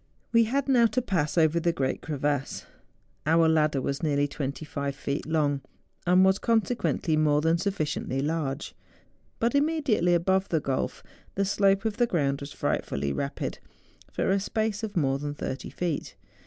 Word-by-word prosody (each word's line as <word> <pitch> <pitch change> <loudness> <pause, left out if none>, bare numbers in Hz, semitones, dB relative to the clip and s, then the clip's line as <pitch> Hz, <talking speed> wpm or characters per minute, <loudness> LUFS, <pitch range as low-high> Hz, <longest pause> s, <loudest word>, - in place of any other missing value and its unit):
We 230 -1 +5
had 275 +5 -1
now 245 -4 +5
to 255 - 0
pass 175 -7 -1
over 160 0 +4
the 170 +1 +1
great 135 -5 -2
crevasse. 145 -2 -2 0.6
Our 165 +1 +5
ladder 155 -3 +2
was 140 0 -2
nearly 145 -2 +1
25 140 0 -4
feet 140 +1 -3
long, 145 -3 +1 0.5
and 180 +1 +6
was, 190 +1 +3
conse¬ 230 +1 +1
quently, 165 -8 0
more 150 -1 +3
than 165 +2 +2
sufficiently 155 -8 -2
large. 145 -1 -2 0.6
But 235 +3 +1
imme¬ 305 +2 +1
diately 175 -9 +3
above 190 +3 +1
the 160 - +2
gulf, 135 -2 -2 0.3
the 195 - +1
slope 195 +1 +2
of 220 -1 -1
the 240 -1 +3
ground 140 -8 0
was 140 0 -7
frightfully 70 0 -2
rapid, 140 - -3 0.5
for - - 0
a 195 - +3
space 215 +1 -1
of 215 -4 -4
more 135 -3 +1
than 145 0 -4
thirty 135 -2 -5
feet. 170 -10 -3
160 Hz, 170 wpm, -27 LUFS, 145-200 Hz, 0.6 s, and